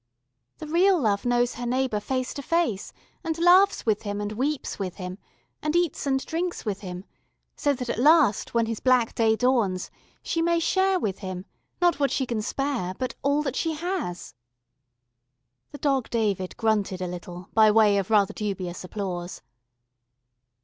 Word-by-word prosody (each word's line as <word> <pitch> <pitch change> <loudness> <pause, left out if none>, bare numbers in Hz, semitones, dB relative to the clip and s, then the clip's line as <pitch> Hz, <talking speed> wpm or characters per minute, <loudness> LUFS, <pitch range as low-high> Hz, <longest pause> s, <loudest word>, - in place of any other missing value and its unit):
"The - - -7
real 355 +4 +3
Love 210 -5 0
knows 245 0 +2
her 245 - -6
neighbour 255 -3 0
face 255 +4 -2
to 280 - -5
face, 310 - 0 0.3
and 325 -2 -2
laughs 360 +4 +5
with 215 -3 +1
him 205 -1 -4
and 205 0 -3
weeps 265 +5 -2
with 185 -3 -3
him, 185 0 -7 0.4
and 305 +2 -1
eats 345 -4 0
and 265 -1 0
drinks 345 -1 -3
with 205 -2 -2
him, 180 -1 -7 0.5
so 285 - +1
that 250 -2 -5
at 235 - -2
last, 290 -7 +4
when 230 -1 +3
his 225 -1 -3
black 250 -3 +3
day 225 -1 +3
dawns, 220 -7 +1 0.3
she 330 - -1
may 340 0 +2
share 380 +3 +2
with 200 - -2
him, 185 -2 -6 0.4
not 345 -4 +3
what 280 -1 +2
she 265 - 0
can 235 -3 -2
spare, 240 -6 -2
but 255 - -3
all 285 +2 +1
that 270 - -3
she 325 -1 0
has." 330 - -4 1.4
The - - -8
Dog 275 -4 0
David 205 -5 -1
grunted 210 -4 0
a 185 - -2
little, 175 0 -8
by 220 -1 +6
way 210 -2 +5
of 195 - -4
rather 205 -3 +3
dubious 185 -4 -4
applause. 180 - -5
235 Hz, 170 wpm, -25 LUFS, 200-290 Hz, 1.4 s, by